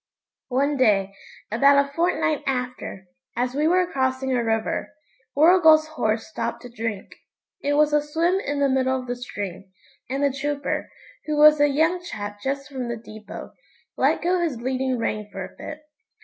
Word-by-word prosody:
One 280 +3 +1
day, 200 -6 +3 0.4
about 280 +5 +5
a 280 - -14
fortnight 330 -2 +1
after, 250 -7 -3 0.3
as 245 +1 0
we 295 +3 +1
were 365 +2 +3
crossing 260 -4 -1
a 240 - +1
river, 225 +5 -1 0.4
Warrigal's 315 0 +6
horse 220 -8 -1
stopped 235 +2 -4
to 245 - -9
drink. 225 -4 -5 0.4
It 285 - 0
was 300 0 +3
a 295 - +4
swim 330 +5 +1
in 290 -6 -2
the 280 - +4
middle 260 0 +1
of 255 - -8
the 245 0 -3
stream, 200 -6 -7 0.4
and 270 +2 -1
the 280 -2 +2
trooper, 285 +1 -2 0.4
who 305 -1 -1
was 300 0 +7
a 290 - +6
young 320 +5 +2
chap 205 -12 -7
just 275 +2 -3
from 260 -4 -5
the 235 - -3
depot, 215 -1 -10 0.4
let - - +2
go 360 +1 +2
his 320 -9 -1
leading 260 +1 -1
rein 215 -2 -2
for 190 -1 -5
a 190 - -14
bit. 305 0 -8
270 Hz, 175 wpm, -24 LUFS, 235-300 Hz, 0.4 s, was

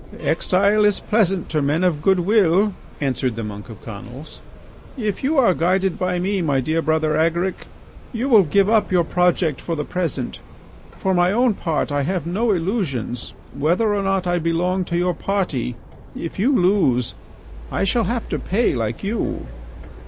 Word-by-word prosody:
"Exile 200 +3 +2
is 205 -1 +3
pleasant 195 -5 +1
to 155 -1 0
men 145 +5 +1
of 170 -5 +1
good 190 +2 +3
will," 200 0 +3 0.3
answered 130 -3 -1
the 115 - -4
monk 105 +1 -7
of 110 - -11
Conils. 120 +7 -9 0.6
"If 215 -3 -3
you 290 +3 +1
are 240 -8 +5
guided 185 +2 0
by 180 -1 0
me, 190 +2 0
my 145 -5 +1
dear 155 +5 0
Brother 155 -1 +1
Agaric, 170 +4 0 0.4
you 245 +2 -2
will 225 -6 +7
give 195 +4 +2
up 215 -2 +2
your 180 -2 +3
project 175 -3 +1
for 165 - -3
the 150 -1 -3
present. 165 -8 -3 0.6
For 190 - 0
my 175 0 +3
own 240 +2 +3
part 165 -6 -2
I 145 0 +1
have 175 +3 -2
no 205 +8 0
illusions. 165 - -2 0.2
Whether 180 +9 +1
or 205 - 0
not 195 -1 0
I 175 0 +1
belong 175 +3 0
to 170 - -2
your 180 0 +1
party, 160 -10 -2 0.4
if 170 - -6
you 240 +8 +3
lose, 180 - +2 0.6
I - - -1
shall 225 +3 +1
have 235 +4 -2
to - - -2
pay 225 +6 +1
like 115 -2 -3
you." 210 +3 -2
180 Hz, 175 wpm, -21 LUFS, 155-200 Hz, 0.6 s, will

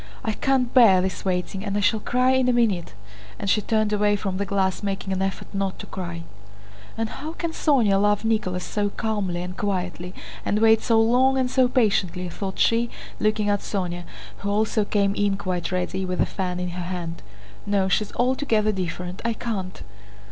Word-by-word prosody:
I 220 - 0
can't 255 +2 +1
bear 225 -8 +7
this 185 0 -2
waiting 185 +1 -2
and 205 -1 -2
I - - +2
shall 215 +2 +2
cry 250 +4 +2
in 260 -1 +3
a - - +3
minute!" 210 - +1 0.4
and 200 - -5
she 210 - +3
turned 215 0 +1
away 205 0 +3
from 195 -2 -3
the 200 0 -2
glass, 190 -2 0
making 195 -1 -2
an 190 - -1
effort 195 0 -3
not 195 -1 -2
to - - -8
cry. 170 -3 -6 0.7
"And 225 0 0
how 305 +8 -7
can 335 -1 -3
Sónya 235 -12 +3
love 205 +1 +2
Nicholas 185 -5 0
so 205 -1 -1
calmly 200 -5 -2
and 180 0 -6
quietly 185 -2 -3 0.3
and 205 - 0
wait 220 0 +5
so 225 -1 +3
long 250 +4 +4
and 255 -1 0
so 260 -1 +4
patiently?" 195 -8 +1
thought 190 +2 -5
she, 235 +1 +3 0.3
looking 215 0 +1
at 205 0 +2
Sónya, 175 -4 -3 0.3
who 200 - -4
also 215 +1 +1
came 200 -1 +1
in 200 -1 +1
quite 185 -3 -3
ready, 185 +1 -1
with 180 -1 -3
a - - +4
fan 180 -2 -3
in 180 0 -2
her 175 0 -5
hand. 170 -2 -5 0.5
"No, 200 -2 +2
she's 200 +2 0
altogether 245 -4 +2
different. 180 -1 -4
I 230 0 +1
can't!" 200 -6 -4
200 Hz, 190 wpm, -24 LUFS, 185-225 Hz, 0.7 s, bear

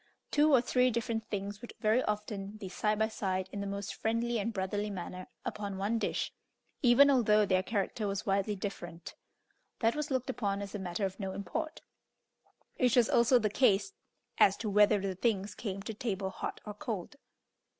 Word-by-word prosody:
Two 300 +1 +4
or 260 -4 +6
three 250 +1 +3
different 225 -1 -2
things 200 +1 -4
would 240 - -9
very 220 +3 +3
often 210 -1 -3
be 200 - -7
side 210 +3 0
by 220 +1 +2
side 190 -4 -2
in 200 - -4
the 200 - -3
most 200 0 -4
friendly 230 +1 0
and 225 +3 -1
brotherly 205 +1 -2
manner 185 -1 -6 0.2
upon 200 -2 -4
one 210 +4 0
dish, - - -1 0.5
even 275 +3 +7
although 215 -5 +4
their 185 -1 +3
character 205 +1 -2
was 200 +1 -2
widely 200 +1 +1
different; 175 -4 -6 0.6
that 225 0 +2
was 300 0 -2
looked 260 -1 0
upon 200 -5 -1
as 200 -1 -6
a 205 - -3
matter 190 +2 -2
of 190 +1 -5
no 190 -2 -3
import, 315 - -4 1.0
which 250 -2 +4
was 240 -3 +4
also 235 +2 +5
the 220 -3 +2
case 215 - +2 0.5
as 195 - +6
to 215 -3 -3
whether 210 0 +5
the 195 -1 -2
things 200 0 0
came 195 -3 -5
to 220 - -4
table 200 -3 -2
hot - - -5
or 210 - -5
cold. 210 +4 -5
210 Hz, 185 wpm, -32 LUFS, 195-230 Hz, 1.0 s, even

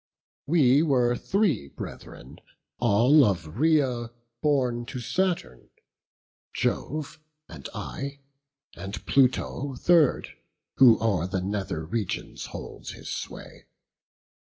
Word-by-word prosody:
We 140 -3 +4
were 125 -6 +2
three 180 - 0
brethren, - - -10 0.4
all 120 +6 +5
of 85 -4 -1
Rhaea 135 -7 +2 0.3
born 125 -5 +1
To 130 - -5
Saturn; 145 - -2 0.9
Jove 155 +2 -2 0.3
and 70 -5 -9
I, 140 0 -5 0.6
and 95 +1 -7
Pluto 135 0 +1
third, 160 +1 +3 0.5
Who 125 -4 +8
o'er 95 -7 0
the 95 0 -2
nether 95 -5 -3
regions 100 +3 -4
holds - - -8
his - - -8
sway. - - -8
125 Hz, 100 wpm, -26 LUFS, 100-145 Hz, 0.9 s, Who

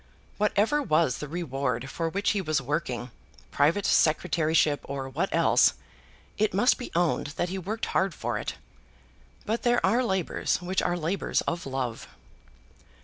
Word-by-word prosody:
Whatever 210 +7 +2
was 155 - +1
the 150 - -5
reward 135 -6 -2
for 165 -1 -2
which 200 +4 0
he 205 - 0
was 155 -4 0
working, 130 -3 -3 0.4
private 165 +8 +2
secretaryship 155 -1 +2
or 135 -1 -4
what 130 - -2
else, - - +4 0.6
it 215 -2 +1
must 245 +7 +3
be 245 - -6
owned 170 -3 +1
that 175 - 0
he 190 +1 -3
worked 215 +5 -3
hard 190 -2 0
for - - -2
it. - - -4 0.9
But 225 +2 -1
there 240 0 +2
are 230 +7 +3
labours 190 -7 0
which 180 +1 -1
are 175 0 0
labours 170 +4 -1
of 170 -3 -3
love. 130 -3 -3
170 Hz, 150 wpm, -27 LUFS, 145-200 Hz, 0.9 s, else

